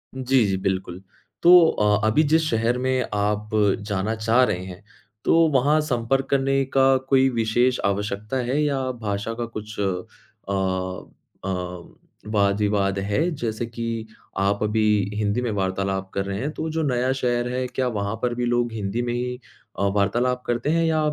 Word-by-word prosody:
जी, 130 -3 +2
जी, 95 -1 0
बिल्कुल। 95 -1 -2 0.4
तो 180 +1 +9
अ, 105 -3 +2
अभी 150 +9 +3
जिस 160 +2 +3
शहर 115 +2 +1
में 130 0 0
आप 105 +1 -1 0.4
जाना 100 +2 -1
चाह 115 +3 +3
रहे 95 -6 0
हैं, 90 +2 -10 0.4
तो - - +4 0.2
वहाँ 145 +4 +3
संपर्क 135 -1 0
करने 135 0 +2
का 135 0 +5
कोई 135 -1 +5
विशेष 120 +2 +1
आवश्यकता 105 +4 -2
है 140 +4 +1
या 140 -2 0 0.2
भाषा 105 +2 -2
का - - -1
कुछ 105 0 -8
अ - - +1 1.6
अ, - - -2 0.8
वाद-विवाद 100 -1 +1
है? 105 - 0
जैसे 115 -2 -3
कि 115 -1 -4 0.3
आप 100 +1 +1
अभी 110 +1 +1 0.3
हिंदी 105 +3 0
में 120 - -1
वार्तालाप 95 0 -2
कर 100 0 -1
रहे 100 0 -3
हैं, 145 +5 -2
तो 160 +1 -4
जो 160 0 -1
नया 130 -1 +1
शहर 120 -2 0
है, 130 0 -1
क्या 125 +1 -2
वहाँ 105 -2 -2
पर 125 -1 0
भी 120 0 -1
लोग 120 -1 +1
हिंदी 105 +2 -2
में 120 0 -2
ही 125 +1 -3 0.4
अ, - - +1
वार्तालाप 120 +5 +1
करते 120 +4 -1
हैं 165 +1 +2
या 160 -1 +2
115 Hz, 170 wpm, -23 LUFS, 100-130 Hz, 1.6 s, तो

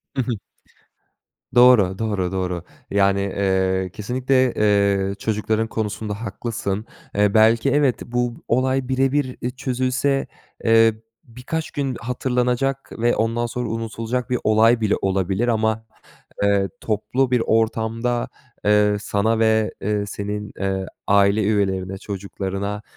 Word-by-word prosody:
Hı 130 - +1
hı. 120 - -2 1.2
Doğru, 120 -7 +6
doğru, 100 -5 -1
doğru. 90 -2 -2 0.3
Yani, 100 -1 +3
eee, 95 -1 0
kesinlikle, 130 +3 +1
eee, 100 -2 +2
çocukların 110 +1 -1
konusunda 110 -1 -4
haklısın. 110 -2 -3 0.3
Eee, 100 0 +3
belki 115 +4 +4
evet, 140 -3 +2
bu 120 0 -1
olay 130 +1 +1
birebir 130 0 0
e, 125 - -1
çözülse, 130 +1 -1 0.4
eee, 115 0 +5 0.3
birkaç 130 +5 -5
gün 135 -3 -2
hatırlanacak 125 +2 -1
ve 120 +1 +2
ondan 115 +2 0
sonra 120 0 -3
unutulacak 115 +2 -3
bir 125 -1 0
olay 115 +2 +4
bile 105 -2 +2
olabilir. 95 +3 0
Ama, 110 -1 0 0.6
eee, 100 -1 +2
toplu 110 +4 0
bir 125 -2 +2
ortamda, 115 +2 0 0.4
eee, 105 0 +4
sana 105 +2 0
ve, 110 -1 +2
eee, 105 0 -1
senin, 105 +1 -5
eee, 95 -1 -1 0.2
aile 100 +1 +4
üyelerine, 95 -2 0
çocuklarına, 100 +1 -4
110 Hz, 120 wpm, -22 LUFS, 100-125 Hz, 1.2 s, Doğru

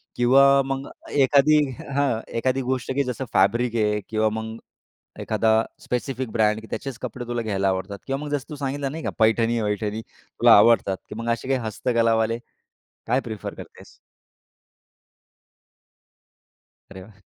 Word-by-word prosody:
किंवा 135 +3 +5
मग 135 0 -4 0.2
एखादी 140 +2 +4 0.2
हं, - - -9
हां, 140 -5 +1 0.2
एखादी 130 +3 0
गोष्ट 130 0 -2
की 140 - +2
जसं 125 +1 -4
फॅब्रिक 115 +5 +2
आहे 105 -2 +1
किंवा 110 0 +1
मग 110 0 -5 0.6
एखादा 110 -1 +1 0.3
स्पेसिफिक 125 0 -3
ब्रँड 110 0 +1
त्याचेच 135 -4 -5
कपडे 125 -1 -6
तुला 120 0 -2
घ्यायला 100 -3 -1
आवडतात 95 +2 -3
किंवा 135 0 -2
मग 145 - -5
जसं 145 -1 -3
तू 150 - -6
सांगितलं 140 0 -3
नाही 160 +2 -6
का - - -1
पैठणी-वैठणी 110 -1 +1
तुला - - +1
आवडतात, 105 -3 +4
की - - -7
मग 115 +1 -4
असे 115 - -6
काही 135 -1 +1
हस्तकलावाले, 115 0 +1 0.7
काय 125 +3 +2
प्रिफर 110 -5 -6
करतेस? - - -13 3.0
अरे 95 -1 -9
वाह! 100 0 -18
115 Hz, 140 wpm, -23 LUFS, 110-135 Hz, 3.0 s, किंवा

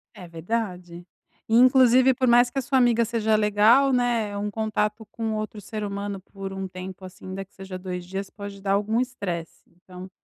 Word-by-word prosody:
É 180 -4 -10
verdade. 175 -1 -4 0.4
E 225 - +3
inclusive 255 0 +6
por 255 +1 0
mais 240 +1 +5
que 275 - -9
a - - -1
sua 265 +1 0
amiga 235 -2 +4
seja 220 -1 +1
legal, 215 +6 +4
né, 240 -4 +1
é 205 - -6
um 205 +1 -2
contato 215 0 -2
com 225 -1 -3
outro 215 0 -4
ser 210 +1 -6
humano 200 -1 -4
por 195 0 -8
um 190 0 -4
tempo, 185 +1 -9
assim, 185 0 -12
ainda 190 +1 -5
que 195 - -25
seja 190 -1 -8
2 180 -1 -6
dias 195 +2 -5
pode 200 -1 -9
dar 195 0 0
algum 215 +4 +1
estresse, 190 -10 -5
então 180 +1 -12
205 Hz, 200 wpm, -24 LUFS, 190-230 Hz, 0.4 s, inclusive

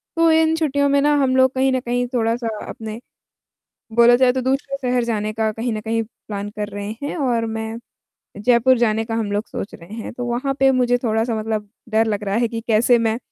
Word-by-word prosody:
तो 330 0 +4
इन 320 0 +3
छुट्टियों 285 -3 +1
में 280 - +3
ना 295 +1 +3
हम 260 -1 +2
लोग 260 0 +4
कहीं 265 0 +2
न 260 - +1
कहीं 245 0 -1
थोड़ा-सा 230 0 0 0.2
अपने 220 0 -7 1.0
बोला 235 +1 +7
जाए 250 0 +4
तो 260 - -1
दूसरे 270 +2 -1
शहर 250 -1 +2
जाने 215 -2 -2
का 220 0 0
कहीं 225 +2 -3
न 215 - -4
कहीं 225 +1 -1
प्लान 205 -2 -7
कर 210 0 -5
रहे 205 0 -5
हैं 285 - -3
और 240 -5 0
मैं 225 0 -4 0.6
जयपुर 245 +4 +4
जाने 225 -2 +1
का 225 0 -3
हम 220 -3 -2
लोग 205 +2 -2
सोच 200 - -6
रहे 170 +5 -12
हैं। 225 0 -6
तो 245 +1 -5
वहाँ 250 +3 -1
पे 270 0 +5
मुझे 245 -1 +2
थोड़ा-सा 225 +1 0
मतलब 215 -1 -3 0.2
डर 220 0 +3
लग 210 -1 -2
रहा 200 0 -1
है 235 +1 +2
कि 230 0 -5
कैसे 235 +2 +4
मैं 225 -1 0
235 Hz, 220 wpm, -21 LUFS, 220-260 Hz, 1.0 s, बोला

